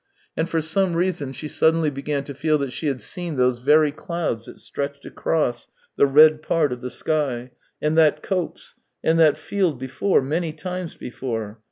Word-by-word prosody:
And 160 +2 -1
for 165 -2 +1
some 175 +3 0
reason 170 -6 -1
she 150 +3 -6
suddenly 160 +1 +2
began 140 +1 -3
to 140 - -7
feel 155 +3 +1
that 140 -3 -3
she 155 - -2
had 135 -3 -1
seen 175 -3 -5
those 125 -1 +2
very 150 +3 +4
clouds 150 -7 -3
that - - -11
stretched 140 0 -5
across 125 -7 -1 0.3
the 140 - +4
red 155 +2 +6
part 155 -3 +1
of 125 - -8
the 125 - -4
sky, 130 -5 -2 0.3
and 150 +1 0
that 150 -1 +4
copse, 180 -4 -3 0.3
and 165 +1 +3
that 155 -3 +5
field 185 -8 0
before, 130 +7 +1
many 160 +3 -1
times 180 +1 -5
before. 115 -4 -5
150 Hz, 180 wpm, -23 LUFS, 135-165 Hz, 0.3 s, red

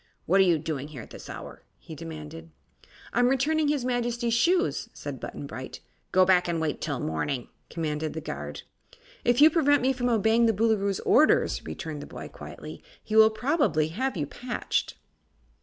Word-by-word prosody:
"What 190 +4 +3
are - - +8
you 175 -3 +4
doing 150 -2 -4
here 140 -7 -9
at - - -15
this - - -10
hour?" - - -8 0.2
he 160 - -11
demanded. 160 0 -8 0.6
"I'm 245 0 +4
returning 295 +4 +2
his 290 -4 0
Majesty's 240 -1 -1
shoes," 350 - +2
said - - -6
Button - - -7
Bright. - - -7 0.3
"Go 185 0 +5
back 180 -1 +4
and 170 -1 -1
wait 160 -2 -2
till 145 -5 -2
morning," 120 - -2 0.2
commanded 155 -2 -3
the 160 - -4
guard. - - -6 0.6
"If 240 +2 +3
you 310 +1 +9
prevent 290 -4 +3
me 265 +1 +3
from 245 -1 -1
obeying 225 +1 +3
the 225 - +3
Boolooroo's 200 -2 +1
orders," 310 - +3
returned 155 -5 -6
the - - -9
boy, - - -8
quietly, - - -10 0.2
"he 215 - -4
will 220 0 +8
probably 220 - +1
have 255 +6 -2
you 150 - -1
patched." 245 - -3
215 Hz, 175 wpm, -27 LUFS, 160-245 Hz, 0.6 s, you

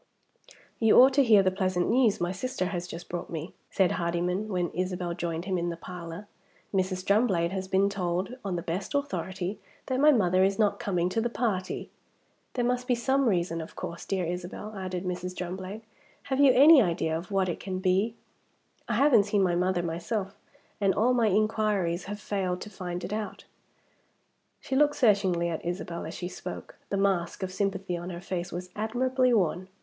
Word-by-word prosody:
"You 225 -2 +6
ought 260 +2 +8
to 280 +1 +5
hear 215 -5 +6
the 185 - +2
pleasant 185 -2 0
news 235 -3 +3
my 175 +1 0
sister 190 0 -3
has 175 -1 -3
just 170 -1 -8
brought 175 - -5
me," 165 +1 -5 0.2
said 190 -2 +2
Hardyman, 175 +4 -1
when 180 -4 -1
Isabel 180 -1 -2
joined 170 -1 -3
him 185 -2 0
in 170 0 -1
the 170 - -5
parlor. 175 +2 -8 0.5
"Mrs. 185 -1 -1
Drumblade 195 -5 +2
has 190 -1 -3
been 190 +1 +3
told, 185 +1 -2
on 195 -3 -2
the 170 - -3
best 185 - -3
authority, 195 -9 -2 0.3
that 260 -1 -1
my 300 +2 +7
mother 185 -7 +3
is 195 +1 +2
not 210 -2 +2
coming 180 -3 0
to 225 +5 0
the 240 - 0
party." 210 -6 -2 0.6
"There 245 -2 +1
must 250 0 0
be 245 - +3
some 265 +2 +2
reason, 170 -3 0
of 160 - -10
course, 170 - -6
dear 190 -3 -1
Isabel," 180 +5 -5
added 185 -1 -4
Mrs. 180 0 -4
Drumblade. 185 +4 -5 0.4
"Have 265 -1 -2
you 280 -2 +7
any 285 +3 +8
idea 165 -4 0
of 170 +2 -5
what 195 -2 +1
it 175 - -3
can 190 -1 -4
be? 190 +4 +1 0.7
I 230 - +1
haven't 240 -4 +5
seen 205 -1 +2
my 180 -2 +2
mother 180 0 +1
myself; 190 +4 -3 0.4
and 195 -2 +2
all 240 +5 +3
my 235 -3 +3
inquiries 205 -4 +1
have 205 +1 -6
failed 190 -3 -2
to 210 - -8
find 180 -2 -5
it 205 - -4
out." 215 -1 -5 1.2
She 265 - -3
looked 295 +1 +4
searchingly 195 -7 +3
at 165 - -4
Isabel 175 -1 -4
as 160 - -7
she 175 - -4
spoke. - - -8
The 200 - -1
mask 190 -2 0
of 185 0 -4
sympathy 195 -2 -1
on 175 +1 -6
her 170 -1 -6
face 180 -1 -4
was 180 +1 -6
admirably 255 +4 +1
worn. 185 -4 +1
190 Hz, 190 wpm, -28 LUFS, 175-215 Hz, 1.2 s, ought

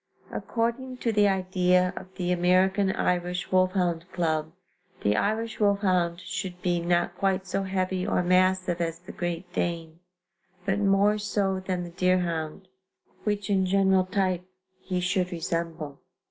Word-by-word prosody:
According 245 +2 -2
to 235 -2 0
the 210 -1 +4
idea 185 -1 +2
of 190 0 -10
the 180 -1 -1
American 185 +2 +3
Irish 180 0 -1
Wolfhound 185 -2 +1
Club, 160 -3 -1 0.5
the 105 +1 +3
Irish 220 - -1
wolfhound 185 -4 +2
should 185 0 -5
be 175 -1 +1
"not 175 0 +1
quite 190 0 0
so 195 +1 -1
heavy 185 0 -1
or 180 - +1
massive 185 -1 +2
as 165 -1 -1
the 175 +1 -11
Great 175 0 -4
Dane, 165 -1 -2 0.7
but 195 +1 +1
more 200 +1 +3
so 200 -2 0
than 185 -1 -3
the 175 - -8
deerhound, 175 -1 0 0.6
which 205 -2 -1
in 190 -1 +2
general 190 -1 +3
type 185 -2 0 0.5
be 180 -1 +1
should 180 0 0
resemble. 165 -4 -3
185 Hz, 140 wpm, -27 LUFS, 175-195 Hz, 0.7 s, the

